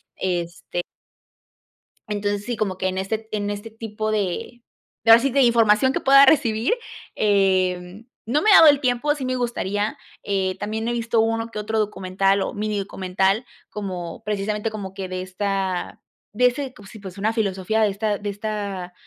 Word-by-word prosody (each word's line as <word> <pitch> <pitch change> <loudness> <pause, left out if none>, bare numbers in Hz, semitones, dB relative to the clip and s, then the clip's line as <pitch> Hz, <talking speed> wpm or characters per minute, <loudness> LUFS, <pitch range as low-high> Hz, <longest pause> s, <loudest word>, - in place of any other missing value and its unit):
este 175 -1 -3 1.3
entonces 205 0 -2
sí, 240 - -2
como 200 -4 -2
que 185 - -1
en 185 - -3
este 220 +3 -3
en 205 -1 -1
este 205 +2 -5
tipo 215 -1 -4
de 215 +4 -3 0.4
de, 225 - +6
ahora 230 - +9
sí, 275 - +1
de 275 +2 +2
información 235 +1 +4
que - - -1
pueda 275 +1 +7
recibir, 245 - +3 0.4
em, 190 0 +1 0.2
no 265 +7 +1
me 430 - +4
ha - - +9
dado 320 - +9
el 290 -1 +5
tiempo, 255 +3 +1
sí, 275 - -6
me 255 0 -1
gustaría, 210 -4 -2 0.3
eh, 190 -2 -1
también 220 +2 -3
he - - 0
visto 235 -1 +1
uno 225 0 0
que 215 - -6
otro 220 +1 -1
documental 195 -1 +1
o - - -2
minidocumental 195 0 -1 0.2
como 185 -3 -6
precisamente 210 +1 -2
como 200 -3 -7
que 195 -1 -5
de 185 0 -4
esta 190 -1 -3 0.3
de 250 +4 +4
ese 260 +1 -3
cos 200 -2 -14
y 215 - -9
pues 190 -1 -10
una 210 +3 0
filosofía 210 -1 0
de 215 - +4
esta 205 +1 -1
de 205 +1 -5
esta 200 -3 -4
210 Hz, 175 wpm, -23 LUFS, 195-225 Hz, 1.3 s, ahora